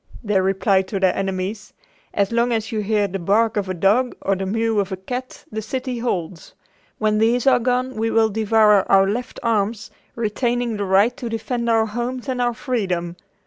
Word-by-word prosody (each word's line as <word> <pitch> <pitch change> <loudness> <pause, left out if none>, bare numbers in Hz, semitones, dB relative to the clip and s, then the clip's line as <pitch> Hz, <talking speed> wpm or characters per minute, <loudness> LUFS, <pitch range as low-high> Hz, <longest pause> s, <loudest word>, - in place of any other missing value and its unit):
They 205 -3 +2
replied 190 0 +1
to 195 0 -3
their 190 -1 +2
enemies: 195 +2 -3 0.4
"As 200 0 0
long 235 +1 +1
as 225 -1 -1
you 220 - -1
hear 210 0 +1
the 195 0 -5
bark 215 +5 +2
of 200 -3 -1
a 185 - -2
dog 210 +8 +2
or 195 - +1
the 190 0 -4
mew 225 +1 0
of 200 -1 -1
a 190 - -3
cat 250 +7 -6
the 220 0 -3
city 250 +2 -4
holds. 180 -7 -4 0.4
When 215 -1 +1
these 230 +2 +2
are 260 -2 +5
gone 250 +2 0
we 225 0 -1
will 225 -1 +3
devour 215 -1 +3
out 195 0 +5
left 245 +4 -4
arms, 220 -1 -1 0.2
retaining 235 +1 -1
the 205 - -2
right 200 +6 +3
to 245 -5 -5
defend 235 +1 -2
our 225 -1 +3
homes 240 +4 -4
and 255 -2 -1
our 240 -1 0
freedom. 190 - -2
220 Hz, 195 wpm, -21 LUFS, 195-235 Hz, 0.4 s, are